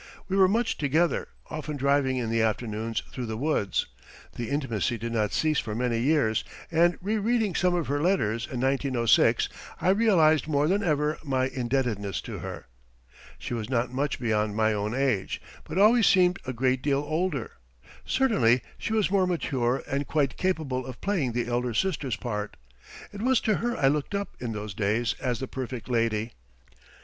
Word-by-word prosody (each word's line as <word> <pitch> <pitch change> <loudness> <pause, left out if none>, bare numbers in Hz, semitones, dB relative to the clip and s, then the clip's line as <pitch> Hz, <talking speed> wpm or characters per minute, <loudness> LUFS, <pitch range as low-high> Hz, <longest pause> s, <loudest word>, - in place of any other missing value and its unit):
We 190 - -1
were 190 -1 +6
much 225 +4 0
together, 155 +4 +1 0.2
often 155 -1 -4
driving 140 -1 +2
in 115 -3 -2
the 115 0 +2
afternoons 110 0 -1
through 125 -2 -5
the 110 0 -4
woods. 125 - 0 0.5
The 120 - -4
intimacy 125 -5 -1
did 115 +1 -4
not 110 -3 0
cease 155 -2 +1
for 105 -2 -4
many 120 -1 0
years, 125 -4 +2 0.3
and 170 +1 +3
re 215 +3 0
reading 220 -2 +1
some 180 +1 +2
of 170 -3 0
her 145 +1 -1
letters 115 - +1
in 125 - -5
1906 130 -3 +3 0.3
I - - +1
realized 175 - +4
more 145 -1 +2
than 195 +4 +2
ever 150 -4 0
my 130 -3 0
indebtedness 120 -6 -1
to - - -7
her. - - -7 0.7
She - - -6
was 115 -1 -3
not 125 -1 0
much 140 +2 -1
beyond 110 -3 0
my 110 0 +2
own 105 +2 -2
age, 130 -8 0 0.3
but 160 - -5
always 220 +3 +6
seemed 180 0 +4
a - - -1
great 130 +1 +1
deal 140 0 +1
older. 155 -6 -1 0.5
Certainly 130 - +2 0.2
she 220 - -3
was 215 -4 +2
more 190 -2 +3
mature 130 -8 0
and 140 +1 -2
quite 145 -4 +1
capable 155 -9 -1
of 130 - -8
playing 170 - 0
the 120 0 -1
elder 120 -1 -1
sister's 145 - 0
part. 105 -2 -4 0.6
It 200 - -7
was 255 0 +3
to 215 -3 +1
her 240 +1 -2
I 135 - +3
looked 150 +7 0
up 200 0 -4
in 120 -2 -4
those 105 -1 -5
days 110 +3 0
as 125 -3 -1
the 130 - -3
perfect 130 -2 -6
lady. 115 -1 0
135 Hz, 180 wpm, -27 LUFS, 115-170 Hz, 0.7 s, were